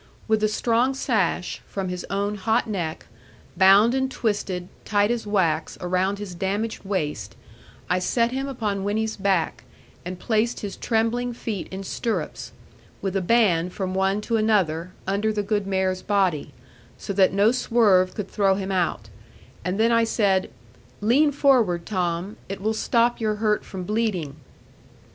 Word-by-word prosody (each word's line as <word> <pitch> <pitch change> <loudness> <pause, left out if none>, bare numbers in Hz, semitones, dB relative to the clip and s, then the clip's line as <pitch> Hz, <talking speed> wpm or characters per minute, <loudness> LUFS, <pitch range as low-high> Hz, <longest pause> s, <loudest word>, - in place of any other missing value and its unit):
With 220 -1 +2
a - - +5
strong 235 +4 +1
sash, 200 -9 -1
from 195 -2 -4
his 180 0 -5
own 200 +1 -1
hot 220 +4 +1
neck, 175 -7 -4 0.5
bound 195 +5 +6
and 265 0 0
twisted, 205 -7 -2 0.2
tight 205 +1 +2
as 235 -3 -2
wax, 170 -6 0
around 185 +2 0
his 200 -3 -7
damaged 200 +5 -2
waist, 150 - -3 0.5
I 180 0 +1
set 235 +5 +1
him 270 +2 -2
upon 210 -7 -2
Winnie's 220 +2 -1
back, 190 -4 0 0.4
and 180 +1 -6
placed 220 +5 0
his 200 -2 -5
trembling 240 +2 0
feet 220 -5 -4
in 190 +1 -6
stirrups, 225 +4 -3 0.5
with 195 -1 -3
a 195 - +1
band 180 -4 +2
from 185 -2 -3
one 190 +2 +1
to 230 +1 0
another, 185 -6 +1
under 200 +3 0
the 210 -1 -1
good 205 -1 -1
mare's 190 -1 0
body; 185 -8 0 0.5
so 200 - -5
that 190 -1 +4
no 200 +4 +4
swerve 215 -7 +3
could 205 -3 -4
throw 195 -1 +2
him 195 0 -3
out: 175 - -1 0.5
and 180 +4 -2
then 230 +1 +4
I 230 0 +4
said, 200 -4 +1 0.5
'Lean 275 +8 +4
forward, 240 -12 +3
Tom; 180 0 -2
it 195 0 -4
will 215 +3 0
stop 235 +2 +1
your 215 -1 +1
hurt 210 0 0
from 190 -2 -7
bleeding.' 190 -8 -1
200 Hz, 155 wpm, -24 LUFS, 185-225 Hz, 0.5 s, bound